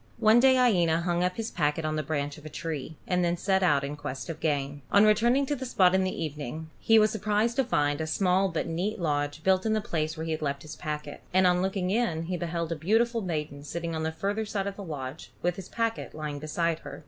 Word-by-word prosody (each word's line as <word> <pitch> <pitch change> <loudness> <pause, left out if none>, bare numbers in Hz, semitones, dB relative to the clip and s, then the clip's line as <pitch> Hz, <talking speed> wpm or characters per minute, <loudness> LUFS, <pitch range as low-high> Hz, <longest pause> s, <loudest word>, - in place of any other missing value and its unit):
One 220 +1 +5
day 260 +1 +6
Iena 175 -10 +3
hung 175 0 0
up 180 0 -1
his 225 0 -3
packet 150 +2 0
on 155 0 -1
the 155 - 0
branch 145 -1 -3
of - - -17
a 155 - -7
tree, 160 -1 -5
and 180 -1 +1
then 175 0 +1
set 190 +2 +1
out 145 -6 +3
in 140 +1 -4
quest 145 +1 -6
of 160 - -9
game. 145 -2 -1
On 200 +1 +6
returning 235 +6 +4
to 290 - -1
the 260 - -6
spot 185 -8 +3
in 190 0 +3
the 185 -2 -2
evening, 155 +1 -6
he 225 - +5
was 215 -1 +5
surprised 215 +2 0
to 270 - +4
find 145 - +1
a 160 - -2
small 185 +3 +2
but 165 - -2
neat 180 +7 -2
lodge 145 -2 -1
built 190 0 +3
in 220 - +1
the 215 - +2
place 160 -5 -2
where 160 - -4
he 165 - -3
had 155 - -2
left 140 -2 -2
his 155 - -8
packet; 150 -1 -5
and 185 0 +5
on 180 0 +4
looking 190 -1 -1
in 205 -8 0
he 180 +2 -3
beheld 170 -1 -3
a - - 0
beautiful 225 +8 +1
maiden 150 -6 -4
sitting 170 +2 -4
on 160 - -2
the 160 0 -1
further 200 +6 -2
side 205 -2 -2
of 200 -1 -4
the 200 - -7
lodge, 145 -3 -6
with 175 0 +1
his 190 -1 -9
packet 230 -6 -2
lying 150 -2 -4
beside 165 +2 -1
her. - - -9
170 Hz, 255 wpm, -28 LUFS, 155-200 Hz, -, day